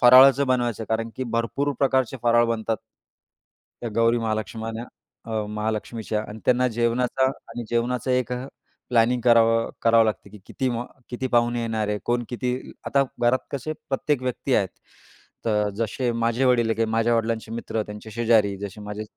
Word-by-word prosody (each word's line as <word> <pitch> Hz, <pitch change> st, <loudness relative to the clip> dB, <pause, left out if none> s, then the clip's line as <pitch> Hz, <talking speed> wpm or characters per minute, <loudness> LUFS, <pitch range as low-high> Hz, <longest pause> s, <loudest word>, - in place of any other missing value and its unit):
फराळाचं 130 Hz, +3 st, +8 dB
बनवायचं 120 Hz, -3 st, +1 dB
आहे. -, -, -7 dB
कारण 115 Hz, 0 st, -5 dB
की 130 Hz, -, -2 dB
भरपूर 115 Hz, +5 st, -1 dB
प्रकारचे 130 Hz, -1 st, +2 dB
फराळ 120 Hz, 0 st, +4 dB
बनतात. 115 Hz, -1 st, -1 dB, 1.1 s
त्या 120 Hz, -, -3 dB
गौरी 115 Hz, +1 st, +4 dB
महालक्षमाना 110 Hz, +1 st, -3 dB, 0.4 s
अ, 110 Hz, -2 st, -2 dB
महालक्ष्मीच्या 110 Hz, 0 st, -2 dB
आणि 105 Hz, +1 st, -8 dB
त्यांना 125 Hz, 0 st, +4 dB
जेवणाचा 120 Hz, +3 st, +1 dB, 0.2 s
आणि 120 Hz, 0 st, -5 dB
जेवणाचा 125 Hz, +2 st, 0 dB
एक 125 Hz, -1 st, +1 dB, 0.6 s
प्लॅनिंग 120 Hz, +1 st, +3 dB
करावं 115 Hz, -1 st, +4 dB
करावं 115 Hz, -1 st, +5 dB
लागते 105 Hz, -2 st, -3 dB
की 105 Hz, -, -12 dB
किती 130 Hz, -1 st, -1 dB, 0.4 s
किती 130 Hz, +1 st, -3 dB
पाहुणे 120 Hz, 0 st, +2 dB
येणार 110 Hz, -2 st, -1 dB
आहे. 105 Hz, 0 st, 0 dB
कोण 120 Hz, 0 st, +1 dB
किती 125 Hz, +1 st, -3 dB
आता 140 Hz, 0 st, +3 dB, 0.2 s
घरात 120 Hz, +2 st, +4 dB
कसे 145 Hz, +3 st, -3 dB, 0.2 s
प्रत्येक 140 Hz, 0 st, 0 dB
व्यक्ती 125 Hz, -1 st, -2 dB
आहेत. -, -, +2 dB, 0.8 s
तर 105 Hz, -2 st, +2 dB
जसे 115 Hz, +3 st, -1 dB
माझे 115 Hz, +2 st, +1 dB
वडील 125 Hz, -2 st, +4 dB
आहे, 115 Hz, -, +1 dB
काही 115 Hz, -, +1 dB
माझ्या 115 Hz, +1 st, +2 dB
वडिलांचे 115 Hz, -1 st, -1 dB
मित्र, 115 Hz, -1 st, -3 dB
त्यांचे 105 Hz, +1 st, -9 dB
शेजारी. 110 Hz, -3 st, +3 dB
जसे 100 Hz, +1 st, -7 dB
माझे 105 Hz, +1 st, -5 dB
115 Hz, 160 wpm, -24 LUFS, 110-125 Hz, 1.1 s, फराळाचं